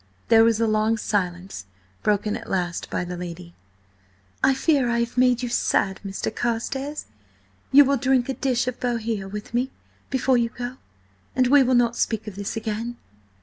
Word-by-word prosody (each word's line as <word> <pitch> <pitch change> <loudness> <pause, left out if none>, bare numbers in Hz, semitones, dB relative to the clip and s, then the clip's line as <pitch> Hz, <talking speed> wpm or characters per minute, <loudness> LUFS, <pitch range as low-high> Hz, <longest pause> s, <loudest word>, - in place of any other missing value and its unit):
There 225 0 +7
was 230 -1 +3
a 230 - +3
long 215 +1 +2
silence, 180 - -3 0.3
broken 210 0 +1
at - - -8
last 175 -3 -2
by - - -2
the 180 0 -5
lady. 175 0 -8 0.9
"I 270 - +5
fear 270 -3 +2
I 235 - +1
have 235 +1 -3
made 250 -1 +3
you 245 - -2
sad, 195 -4 +1
Mr. 195 -1 -4
Carstares. 265 +5 -2 0.7
You 285 +1 +8
will 275 +1 +2
drink 255 0 +2
a 270 - -1
dish 250 -1 0
of 255 - -3
Bohea 225 -5 -2
with 210 +3 -7
me, 250 +2 +1 0.4
before 265 -1 +2
you 230 -1 +1
go? 245 +2 -6 0.6
And 255 - +3
we 280 +3 +6
will 255 -1 +3
not 240 -1 +3
speak 220 -2 -1
of 210 - -6
this 200 0 -4
again." 225 +2 -4
235 Hz, 180 wpm, -24 LUFS, 210-255 Hz, 0.9 s, You